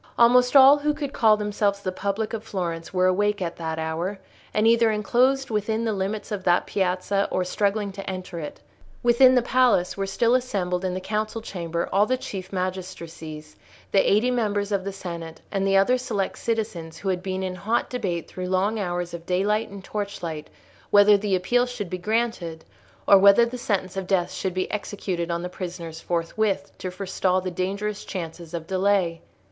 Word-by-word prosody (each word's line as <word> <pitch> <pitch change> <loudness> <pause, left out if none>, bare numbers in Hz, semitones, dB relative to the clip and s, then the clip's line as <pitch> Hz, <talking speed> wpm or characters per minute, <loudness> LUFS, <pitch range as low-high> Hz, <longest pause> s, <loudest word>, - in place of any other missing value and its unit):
Almost 245 +2 +5
all 275 +2 +9
who 300 +1 0
could 285 -3 -4
call 215 -2 +4
themselves 205 -1 0
the 185 - -2
public 200 +4 -2
of 220 -1 -4
Florence 170 -5 -4
were 185 -1 +2
awake 205 +3 +2
at 175 -2 -3
that 160 -1 -3
hour, 160 +5 -2 0.3
and 215 - +1
either 230 0 +5
enclosed 245 +5 +2
within 220 +2 0
the 220 - 0
limits 200 +3 -3
of 200 -3 -3
that 175 -1 +3
piazza, 190 +1 0
or 185 - 0
struggling 200 +2 0
to 195 0 -7
enter 185 -2 -5
it. 150 -2 -7 0.4
Within 255 +2 +6
the 250 - +3
palace 245 -8 +3
were 195 -1 -2
still 230 +5 +2
assembled 195 -8 0
in 185 -1 -1
the - - -2
council 215 +3 -2
chamber 170 -6 -4
all 205 +2 +4
the 255 - +1
chief 190 -6 -7
magistracies, 170 -5 -5 0.4
the 195 - +4
eighty 220 +5 +3
members 205 -4 0
of 195 -2 0
the 200 - -2
senate, 170 -4 -7
and 195 -1 0
the 195 0 +4
other 250 +6 +3
select 215 -6 -2
citizens 190 -8 -3
who 195 - -3
had 180 -1 0
been 190 0 -3
in 185 -1 -2
hot 220 +6 -1
debate 180 -9 -3
through 185 0 -6
long 200 +4 +1
hours 175 -2 -3
of 170 0 -8
daylight 205 +4 +1
and 200 -1 -10
torchlight 175 -7 -5 0.4
whether 205 0 +7
the 200 -1 +1
Appeal 245 +7 +2
should 225 -7 -6
be 185 - -3
granted 210 -6 -2 0.4
or 200 - +8
whether 200 +4 +7
the 245 +1 -6
sentence 195 -5 -1
of 190 -1 -4
death 180 -2 +1
should 185 -1 -3
be 185 - -1
executed 190 -4 -3
on 170 0 -2
the - - -2
prisoners 175 -3 -7
forthwith, 190 +3 -1
to 185 - -4
forestall 185 0 0
the 185 0 -4
dangerous 200 +4 -3
chances 170 -2 -6
of 165 -1 -5
delay. 190 -2 +1
195 Hz, 190 wpm, -24 LUFS, 180-215 Hz, 0.4 s, all